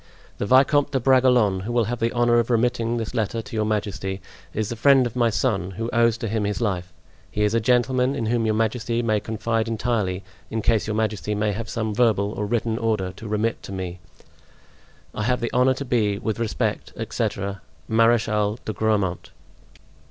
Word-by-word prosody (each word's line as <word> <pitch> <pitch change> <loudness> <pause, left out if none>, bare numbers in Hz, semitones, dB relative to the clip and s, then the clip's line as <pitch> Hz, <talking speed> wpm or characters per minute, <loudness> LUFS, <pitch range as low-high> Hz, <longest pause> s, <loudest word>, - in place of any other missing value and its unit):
The 100 - -1
Vicomte 140 +3 +4
de 135 - +2
Bragelonne, 125 -6 +4
who 100 +6 -5
will 120 -1 +2
have 115 +2 -3
the 115 +1 +1
honor 120 -1 +3
of 115 - -1
remitting 120 0 +1
this 115 -1 -4
letter 115 -1 -1
to 130 -1 -9
your 110 -1 +1
majesty, 100 -2 -2 0.3
is 110 -1 -2
the 120 - -3
friend 135 +2 +5
of 120 - -4
my 120 -2 +3
son, 105 -5 0
who 115 +1 -3
owes 115 -1 +3
to 115 - -4
him 110 0 -1
his 105 0 -1
life; 95 -6 -2 0.4
he 105 - -1
is 105 +1 +2
a 115 - +3
gentleman 125 +3 +2
in 115 - -2
whom 115 +1 +1
your 110 - +1
majesty 115 +1 0
may 110 -2 +2
confide 115 +1 -2
entirely, 110 -5 -1 0.3
in 110 -1 -3
case 110 -3 +2
your 110 - -1
majesty 105 -1 -1
may 105 0 0
have 110 +2 -5
some 110 -2 -2
verbal 105 -3 +2
or 105 -1 -3
written 115 0 -1
order 110 -5 0
to 105 +5 -10
remit 110 +2 -1
to - - -9
me. 90 -2 -5 1.1
"I - - -4
have 125 +3 +1
the 120 - -3
honor 125 +1 +4
to 140 - -5
be, 105 -5 +1
with 110 +1 -3
respect, 115 -2 -2
etc., 100 -1 -3 0.3
"Marechal 110 -2 +2
de 110 - -3
Grammont." 105 -5 0
110 Hz, 195 wpm, -23 LUFS, 105-120 Hz, 1.1 s, friend